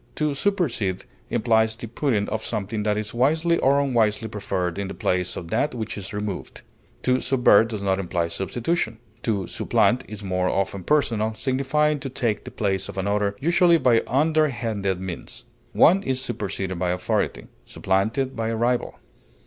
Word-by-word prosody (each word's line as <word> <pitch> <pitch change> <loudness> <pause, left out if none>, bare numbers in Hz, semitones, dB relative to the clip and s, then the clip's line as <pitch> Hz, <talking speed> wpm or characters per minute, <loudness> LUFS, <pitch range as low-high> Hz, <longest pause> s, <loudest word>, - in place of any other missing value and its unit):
To 150 -1 0
supersede 135 - -1 0.2
implies 110 -1 +2
the 115 - -7
putting 115 -3 0
of 110 0 -3
something 105 +2 -3
that 105 0 0
is 110 +1 -3
wisely 160 +7 +2
or 140 +1 +4
unwisely 115 -5 +1
preferred 95 -4 -3
in 100 - -2
the - - -7
place 90 0 -1
of 85 - -7
that 145 - 0
which 110 -2 -4
is 100 -1 -7
removed; 105 -2 -5 0.4
to 130 0 +2
subvert 120 -5 +5
does 110 -3 -5
not 95 -1 +1
imply 85 -2 -1
substitution. 115 - -2 0.2
To 100 -6 -1
supplant 120 +7 +1
is 105 -1 -8
more 90 -1 0
often 95 -1 -2
personal, 110 -7 +1
signifying 140 +4 +1
to 135 - -5
take 120 -4 -1
the - - -6
place 95 -3 -1
of - - -8
another, 100 +1 0
usually 170 +2 +4
by 125 -6 +4
underhanded 120 - +1
means; 95 -2 -7 0.3
one 185 +5 +5
is 130 -7 -1
superseded 95 -7 -3
by 90 0 0
authority, 90 0 -1 0.2
supplanted 110 +8 -1
by 115 0 -2
a 115 - -1
rival. 120 +2 0
110 Hz, 165 wpm, -24 LUFS, 100-135 Hz, 0.4 s, subvert